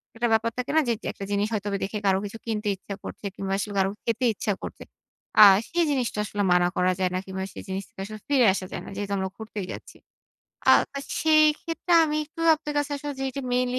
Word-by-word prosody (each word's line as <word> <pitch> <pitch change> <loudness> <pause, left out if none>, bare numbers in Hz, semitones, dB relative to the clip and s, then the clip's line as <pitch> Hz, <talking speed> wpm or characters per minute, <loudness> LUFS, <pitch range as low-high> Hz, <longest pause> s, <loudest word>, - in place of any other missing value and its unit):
একটা 240 +1 0
ব্যাপার 225 +1 +2
থাকে 250 +2 -2
না? - - +7
যে 235 - +3
যেক - - -6
একটা 200 - -7
জিনিস 205 +1 +1
হয়তোবা 205 -1 -1
দেখে 200 +2 -3
কারো 190 -1 +4
কিছু 205 +2 -7
কিনতে 215 -2 -2
ইচ্ছা 195 +1 -8
করছে, - - -8
কিংবা 195 0 -3
আসলে 205 +1 -3
কারো 190 0 +3
খেতে 230 +2 0
ইচ্ছা 205 - -1
করছে। - - -7 0.6
আ - - +13 0.3
সেই 345 +1 +2
জিনিসটা 250 -6 -1
আসলে 205 0 -2
মানা 180 0 +4
করা 180 0 +3
যায় 185 - +2
না, 185 - 0
কিংবা 190 0 -4
সেই - - -8
জিনিসটা 190 0 -5
আসলে 215 +1 -8
ফিরে 275 -4 +4
আসা 190 - -4
যায় - - -5
না। - - -9
যেহেতু 200 0 -4
আমরা 190 0 -2
ঘুরতেই 215 -3 -6
যাচ্ছি। - - -10 0.7
আ - - +10 0.2
তা 280 - -4 0.2
সেইক্ষেত্রে, 310 +2 +3
আমি 305 -1 -1
একটু 325 +2 -12
আপনার 300 -1 -6
কাছে 290 0 -1
আসলে 290 +1 -5
যেইটা 270 0 -2
মেইনলি 250 0 +1
220 Hz, 220 wpm, -25 LUFS, 195-275 Hz, 0.7 s, আ